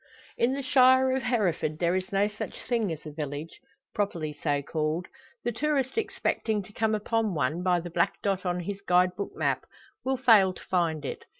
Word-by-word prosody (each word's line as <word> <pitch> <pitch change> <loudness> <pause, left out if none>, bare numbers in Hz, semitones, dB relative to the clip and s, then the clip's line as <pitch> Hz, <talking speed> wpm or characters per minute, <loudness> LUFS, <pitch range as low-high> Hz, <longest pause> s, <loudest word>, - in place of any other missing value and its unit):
In 240 +3 +2
the 275 0 -3
shire 260 -1 +5
of 265 - -1
Hereford 200 -11 0
there 170 +2 +1
is 185 0 -2
no 200 +1 +3
such 210 0 -7
thing 230 -6 0
as 160 0 -6
a 155 - -6
village 150 +1 -6 0.3
properly 170 -8 -2
so 145 -1 -1
called. 155 +3 -1 0.4
The 240 - 0
tourist 275 +1 0
expecting 220 - -1
to 210 - -16
come 220 0 +1
upon 215 -2 0
one, 150 +4 0
by 180 -1 +2
the 175 0 -7
black 170 0 +1
dot 195 -2 0
on 180 -1 -1
his 200 +3 -5
guide 180 -1 +3
book 200 - -5
map, - - -1 0.4
will 265 0 0
fail 220 -7 +5
to - - -12
find 165 -5 0
it. - - -5
190 Hz, 195 wpm, -28 LUFS, 165-230 Hz, 0.4 s, shire